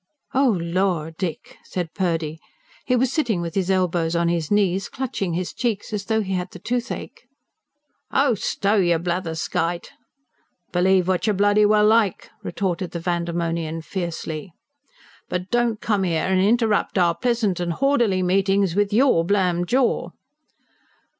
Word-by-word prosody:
("Oh 260 -6 +3
lor, 170 -2 0
Dick!" 165 -1 -5
said 175 -3 -4
Purdy. 165 -5 -1 0.5
He 255 - +3
was 255 +1 +1
sitting 235 - 0
with 170 -1 -4
his 190 -1 -1
elbows 175 -3 +1
on 170 0 +2
his 170 -3 -1
knees, 195 -2 +1
clutching 215 -9 -3
his 180 0 -3
cheeks 225 -3 -2
as 200 -2 -3
though 220 -1 +1
he 190 -2 -3
had 180 -1 -2
the - - -11
toothache.) 240 +3 -4 0.8
"Oh, 275 -2 +3
stow 205 0 0
yer 175 -3 +3
blatherskite!" 170 0 -2 0.8
"Believe 185 0 +3
what 185 +3 0
yer 215 - +3
bloody 205 +1 +4
well 210 0 +4
like!" 215 -3 +2
retorted 185 -2 -3
the 170 - -3
Vandemonian 170 -2 -2
fiercely. 170 -2 -5 0.8
"But 180 +1 -4
don't 240 -2 +1
come 205 -3 +1
'ere 170 0 0
and 185 - +3
interrupt 215 0 +2
our 175 -2 +4
pleasant 230 -5 0
and 175 -1 -1
h'orderly 235 -7 +2
meetings 195 0 +2
with 205 +2 +1
YOUR 230 -6 +4
blamed 180 -2 +1
jaw." 255 +2 +1
185 Hz, 145 wpm, -22 LUFS, 170-210 Hz, 0.8 s, bloody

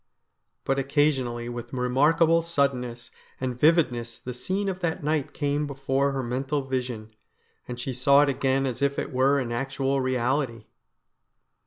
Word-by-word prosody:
But 135 0 +1
occasionally 135 -4 0
with 120 0 -7
remarkable 150 +7 +3
suddenness 130 -7 -1 0.3
and 125 -2 -3
vividness 125 -8 +2
the 125 - -7
scene 190 +11 -2
of 190 -1 -2
that 170 -1 -2
night 150 -1 0
came 145 0 -1
before 135 0 0
her 135 -1 -2
mental 135 +4 -2
vision, 125 -5 -4 0.5
and 125 -1 -6
she 130 +2 -3
saw 140 +3 +5
it 145 - +1
again 135 0 +1
as 130 0 -3
if 140 0 +1
it - - -3
were 135 +2 +3
an 125 -4 -2
actual 135 +2 -1
reality. 130 -2 -1
135 Hz, 150 wpm, -26 LUFS, 125-145 Hz, 0.5 s, saw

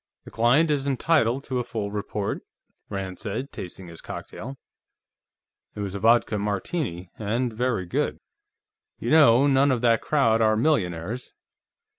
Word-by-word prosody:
"The - - -12
client 135 +8 +3
is 140 -1 0
entitled 135 -2 +2
to 130 -3 -2
a - - -1
full 105 -3 -4
report," 105 -1 -3 0.5
Rand 95 -2 -5
said, 110 +5 -4
tasting 95 0 -8
his 85 -1 -11
cocktail. 135 +5 -8 1.2
It 105 - -5
was 100 -2 -4
a 100 - -4
vodka 115 0 +3
Martini, 100 - -3
and 115 +3 -1
very 115 -4 -1
good. 85 - -1 0.8
"You 120 - -3
know, 140 -5 +6
none 140 0 +4
of 125 -3 0
that 115 -2 +3
crowd 115 -7 +2
are 110 -1 +3
millionaires. 110 - -1
115 Hz, 145 wpm, -25 LUFS, 100-130 Hz, 1.2 s, know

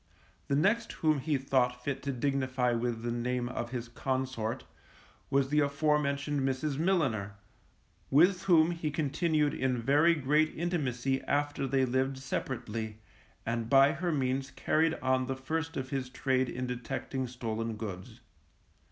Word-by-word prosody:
The 140 - +1
next 210 +10 +2
whom 155 -2 +1
he 150 +1 0
thought 125 -2 0
fit 135 0 -2
to 140 - -2
dignify 130 -1 0
with 120 -1 -1
the 120 - -1
name 120 +1 -1
of 120 -1 -4
his 120 -1 -4
consort, 130 -1 -2 0.7
was 135 -1 +2
the 150 +1 +3
afore 150 +1 +2
mentioned 140 0 -1
Mrs. 135 +2 -1
Milliner, 135 - +1 0.7
with 175 +6 +5
whom 170 -3 +5
he 165 -3 -2
continued 150 0 +1
in 130 -1 0
very 145 +8 +4
great 150 +2 +2
intimacy 135 -6 -1
after 145 -1 0
they 135 0 +2
lived 130 +2 0
separately, 115 -5 -4 0.5
and 115 0 -2
by 135 +1 +6
her 175 +4 -2
means 135 -2 0
carried 160 +3 +1
on 130 0 +2
the 135 - -2
first 160 +5 -3
of 130 -1 -4
his 130 -2 -2
trade 130 -1 0
in 125 +1 -3
detecting 125 +1 -3
stolen 115 -2 -3
goods. 100 -4 -7
135 Hz, 150 wpm, -31 LUFS, 125-150 Hz, 0.7 s, by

